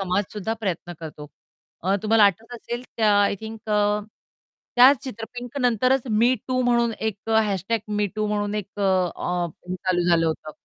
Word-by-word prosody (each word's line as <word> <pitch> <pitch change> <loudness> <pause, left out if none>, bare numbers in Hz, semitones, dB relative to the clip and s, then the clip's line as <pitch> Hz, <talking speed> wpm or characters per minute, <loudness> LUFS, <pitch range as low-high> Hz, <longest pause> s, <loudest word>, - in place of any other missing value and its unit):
समाजसुद्धा 200 +3 -2
प्रयत्न 175 -4 -3
करतो. 150 -2 -8 0.6
अ, 190 +3 +1
तुम्हाला 220 0 +5
आठवत 205 +4 +1
असेल 240 +1 -5
त्या 215 -2 +3
आय 200 - +2
थिंक 220 0 -9
अ, 210 0 +2 0.8
त्या 255 +3 +9
चित्र 230 -4 -6
पिंक 245 +3 -6
नंतरच 250 +1 +2
मी 235 +4 +4
टू 255 0 +1
म्हणून 235 -1 +2
एक 220 -2 -1
अ, 220 - +5
# 200 +3 -1 0.2
मी 210 0 +2
टू 215 0 0
म्हणून 205 0 -1
एक 210 -3 -3
अ, - - +1 0.9
हे 185 - -2
चालू 180 -1 0
झालं 165 -1 +4
होतं. 155 -1 -3
210 Hz, 170 wpm, -24 LUFS, 195-235 Hz, 0.9 s, त्या